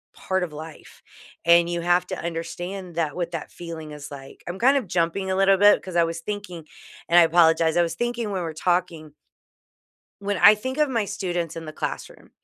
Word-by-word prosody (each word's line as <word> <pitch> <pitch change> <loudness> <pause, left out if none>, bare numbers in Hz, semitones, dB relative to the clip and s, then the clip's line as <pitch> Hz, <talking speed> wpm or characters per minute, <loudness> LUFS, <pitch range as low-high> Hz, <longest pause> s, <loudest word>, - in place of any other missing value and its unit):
part 190 -1 -2
of 160 -4 -5
life, 155 +1 -11 0.4
and 170 0 +5
you 170 0 -2
have 175 +1 +2
to - - -4
understand 175 +2 -5
that 160 -3 -1
what 175 -1 -3
that 165 -3 -6
feeling 165 -3 -8
is 150 -1 -9
like, 135 -1 -11
I'm 175 +2 -5
kind 270 +4 +4
of 240 -8 -3
jumping 175 +2 -1
a - - 0
little 195 0 +4
bit 205 +1 +6
'cause 185 -2 -8
I 170 - +5
was 165 0 -5
thinking 185 -4 -6 0.4
and 175 - +7
I - - +8
apologize, 165 -1 +4
I - - +5
was 165 0 -3
thinking 240 -1 -2
when 190 - -2
we're 160 -1 -4
talking 165 -3 -1 1.1
when 200 -1 -1
I 210 - +8
think 260 +7 -5
of 300 - +3
my 230 -5 0
students 175 -5 -3
in 165 - -6
the 155 - -8
classroom, - - -6
175 Hz, 205 wpm, -24 LUFS, 165-195 Hz, 1.1 s, I